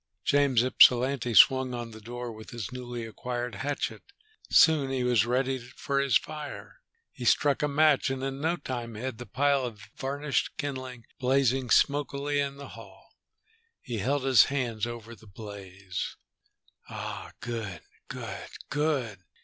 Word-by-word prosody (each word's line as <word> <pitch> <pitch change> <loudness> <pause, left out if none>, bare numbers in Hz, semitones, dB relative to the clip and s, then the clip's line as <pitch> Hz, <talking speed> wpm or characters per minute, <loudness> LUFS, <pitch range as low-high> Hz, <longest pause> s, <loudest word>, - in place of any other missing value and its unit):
James 140 -4 +3
Ypsilanti 125 -1 +4
swung 130 0 +6
on 120 -1 -5
the 110 0 -11
door 120 +2 -6
with 110 0 -11
his 120 -2 -6
newly 120 -2 -6
acquired 120 +2 -4
hatchet. 135 -6 -3 0.5
Soon 155 -4 +5
he 130 -1 -1
was 120 -2 +3
ready 130 +2 0
for 130 +3 -3
his 135 -5 +4
fire. 150 +5 -8 0.3
He - - -9
struck 145 -2 +3
a 150 - +2
match, 150 -1 +3
and 135 0 -3
in 135 0 -3
no 165 +3 +1
time 120 -8 -5
had 120 +1 -5
the 125 - -8
pile 140 +5 +2
of 115 -4 -5 0.2
varnished 140 0 -2
kindling 130 -5 -5
blazing 130 -1 +2
smokily 145 +1 +2
in 140 -1 -1
the 140 - -9
hall. - - -13 0.7
He 120 -3 -5
held 135 +6 0
his 130 -4 +6
hands 120 -5 -2
over 115 -1 -7
the 110 0 -16
blaze. 100 -2 -7 0.7
"Ah, - - -6
good, 110 -8 -5 0.3
good. - - -6 0.2
Good." 145 - 0
125 Hz, 150 wpm, -28 LUFS, 115-140 Hz, 0.7 s, swung